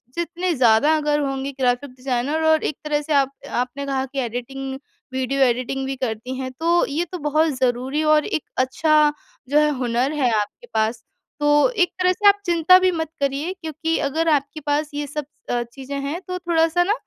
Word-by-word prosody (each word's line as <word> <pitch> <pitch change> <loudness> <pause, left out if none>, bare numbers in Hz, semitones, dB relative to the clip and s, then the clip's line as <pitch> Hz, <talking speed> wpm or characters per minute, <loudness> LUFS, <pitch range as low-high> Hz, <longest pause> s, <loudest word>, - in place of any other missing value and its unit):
जितने 345 +1 -1
ज़्यादा 250 +5 +4
अगर 295 -1 +1
होंगे 270 -1 -2
ग्राफ़िक 250 +2 +1
डिज़ाइनर 260 +4 -2
और 315 0 +4
एक 300 - -2
तरह 295 -1 0
से 300 +1 -3
आप 275 -1 +3 0.2
आपने 250 +3 -2
कहा 265 -1 -1
कि 270 +1 -5
एडिटिंग, 265 +2 -4 0.3
वीडियो 260 +1 -1
एडिटिंग 255 +2 0
भी 270 0 -3
करती 250 0 -4
हैं 260 -1 -4
तो 340 +1 +3
ये 315 +5 -1
तो 360 - -4
बहुत 310 +2 +2
ज़रूरी 260 +4 0
और 305 -1 +4
एक 310 - -2
अच्छा 300 +3 +3 0.4
जो 290 - +3
है 300 - +3
हुनर 250 +2 0
है 270 -5 +1
आपके 210 - -6
पास। 220 +1 0 0.4
तो 295 +7 +4
एक 395 -8 +1
तरह 365 0 +4
से 410 +2 +2
आप 405 0 +5
चिंता 345 +1 +6
भी 370 0 +3
मत 320 -3 -3
करिए 280 +5 -1
क्योंकि 320 +1 -2
अगर 325 +3 0
आपके 285 0 0
पास 295 +1 +1
ये 290 0 -3
सब 295 +1 -4 0.2
अ, 240 0 0
चीज़ें 270 +4 -8
हैं 285 +5 -3
तो 365 0 -3
थोड़ा-सा 340 0 +2
ना, 400 - +1
290 Hz, 195 wpm, -22 LUFS, 260-320 Hz, 0.4 s, चिंता